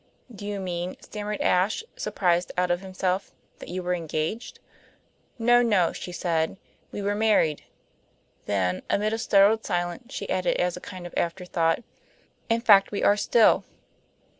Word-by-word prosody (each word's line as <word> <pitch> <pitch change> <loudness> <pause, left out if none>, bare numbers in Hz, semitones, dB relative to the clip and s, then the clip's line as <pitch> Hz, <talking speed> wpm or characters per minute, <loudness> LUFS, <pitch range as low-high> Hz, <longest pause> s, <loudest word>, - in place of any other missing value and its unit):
"Do 205 -1 -8
you 205 -1 -3
mean," 180 -1 -4
stammered 210 0 -5
Ashe, 190 - +2
surprised 180 - 0
out 180 0 +2
of 175 +1 0
himself, 190 0 -2 0.3
"that - - -10
you 180 +1 -4
were 180 0 0
engaged?" 165 +6 -3 0.8
"No, 240 +1 +4
no," 205 -8 +2
she 180 - -7
said. 165 0 -1 0.3
"We 205 - -5
were 205 +1 0
married." 205 -8 +2 0.8
Then, 90 -3 0
amid 210 +2 +1
a 225 - -2
startled 210 +1 +4
silence, 175 +9 -3
she 200 - -5
added, 185 -1 0
as 180 -1 0
a 180 - -9
kind 185 -1 -9
of 175 - -9
afterthought: 170 +1 0 0.7
"In 230 0 +2
fact, 200 -4 +6
we 205 - -2
are 205 - +5
still." 220 +2 +4
185 Hz, 155 wpm, -26 LUFS, 175-210 Hz, 0.8 s, fact